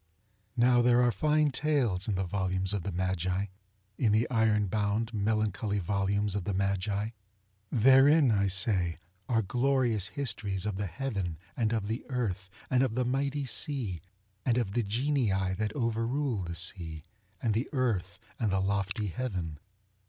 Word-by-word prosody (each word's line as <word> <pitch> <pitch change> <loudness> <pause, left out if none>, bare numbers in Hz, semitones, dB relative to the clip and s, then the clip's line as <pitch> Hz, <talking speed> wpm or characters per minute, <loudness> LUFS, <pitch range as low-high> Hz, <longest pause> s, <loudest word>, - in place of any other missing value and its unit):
ŌĆØ 100 +6 -39
Now 120 0 +5
there 120 0 +4
are 120 - +4
fine 150 +2 +2
tales 130 -10 0
in 105 - 0
the 95 - 0
volumes 95 0 -1
of 100 - -1
the 100 - -4
MagiŌĆöin 95 +2 -1 0.6
the 110 +3 +3
iron 110 -3 +3
bound, 105 +3 -1
melancholy 105 -1 0
volumes 100 +1 0
of 100 -2 -2
the 100 0 -2
Magi. 100 +2 0 0.6
Therein, 135 +3 +6
I 100 -2 +2
say, 90 -3 +1 0.3
are 115 -2 +2
glorious 120 -2 +1
histories 110 -9 -3
of 105 -3 -2
the 100 0 -2
Heaven, 95 - -3 0.2
and 115 -2 0
of 110 -3 0
the 110 +3 -3
Earth, 100 -8 -2 0.2
and 130 -1 +2
of 130 -4 +1
the 125 0 +1
mighty 140 +3 0
seaŌĆöand 120 - -1 0.6
of 115 -6 0
the 120 - +1
Genii 125 +4 0 0.3
that 110 -1 0
over 115 -3 0
ruled 125 -8 -1
the 85 - -5
sea, 85 -3 -2 0.4
and 115 -3 0
the 115 +6 -1
earth, 105 - -1 0.2
and 110 -4 +1
the 95 - +2
lofty 100 +1 -1
heaven. 90 -9 -4
105 Hz, 160 wpm, -30 LUFS, 95-125 Hz, 0.6 s, Therein